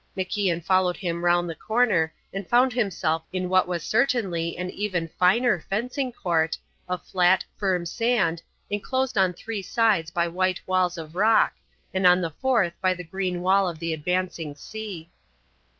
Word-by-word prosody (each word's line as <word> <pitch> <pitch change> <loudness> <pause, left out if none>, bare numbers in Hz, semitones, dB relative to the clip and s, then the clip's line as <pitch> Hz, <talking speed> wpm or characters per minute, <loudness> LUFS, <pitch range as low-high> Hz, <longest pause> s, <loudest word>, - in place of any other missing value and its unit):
MacIan 185 -3 -1
followed 185 -2 +2
him 170 -3 -3
round 175 0 +3
the 165 - -4
corner 210 -4 +1 0.2
and 195 -1 -5
found 250 +1 +4
himself 180 -9 0
in 185 -1 -2
what 185 -1 +3
was 175 -3 -3
certainly 210 -9 0
an 180 +1 -4
even 190 -5 -2
finer 205 +3 +4
fencing 250 - -2
court, 165 -7 0 0.3
of 180 0 -3
flat, 180 0 +3
firm 185 -4 0
sand, 200 -5 0 0.3
enclosed 260 +5 -1
on 190 -2 +3
three 210 +4 -5
sides 200 -5 +1
by 170 +1 0
white 185 +1 0
walls 185 -1 +1
of 160 -1 -8
rock, 215 +4 +4 0.4
and 190 -1 +3
on 180 0 +6
the 165 -3 -2
fourth 220 - +1
by 185 -1 +2
the 180 - -7
green 180 +1 -3
wall 190 0 +3
of 170 - -7
the 165 0 -2
advancing 165 -1 -2
sea. 185 -1 -8
185 Hz, 165 wpm, -25 LUFS, 170-210 Hz, 0.4 s, on